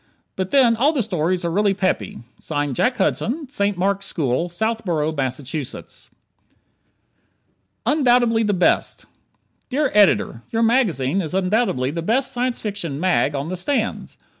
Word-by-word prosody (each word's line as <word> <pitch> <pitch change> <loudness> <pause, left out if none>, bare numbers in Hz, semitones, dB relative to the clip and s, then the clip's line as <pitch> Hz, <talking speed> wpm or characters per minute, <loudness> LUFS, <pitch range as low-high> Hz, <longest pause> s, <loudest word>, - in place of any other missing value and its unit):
But 190 0 -3
then 250 -3 +4
all 280 +8 +2
the 265 -6 0
stories 180 -2 -1
are 170 - -1
really 200 +2 +2
peppy. 185 - -2 0.5
Jack 250 - +1
Hudson, 250 +8 -1
St. 205 -8 -1
Mark's 195 +2 0
School, 155 +2 -1
Southborough, 175 -6 -1
Massachusetts. 135 0 -5 1.8
"Undoubtedly 245 -6 +3
the 210 -2 +1
Best" 180 - +1 0.6
Dear 275 +1 0
Editor: 200 - +3
Your 230 0 0
magazine 195 - +2
is 170 +1 -4
undoubtedly 185 - +1
the 170 +2 -4
best 235 +10 +1
Science 245 0 -1
Fiction 195 -9 -4
"mag" 175 -5 +1
on 140 +3 -3
the 185 - -3
stands. 225 +5 -2
195 Hz, 135 wpm, -21 LUFS, 165-235 Hz, 1.8 s, then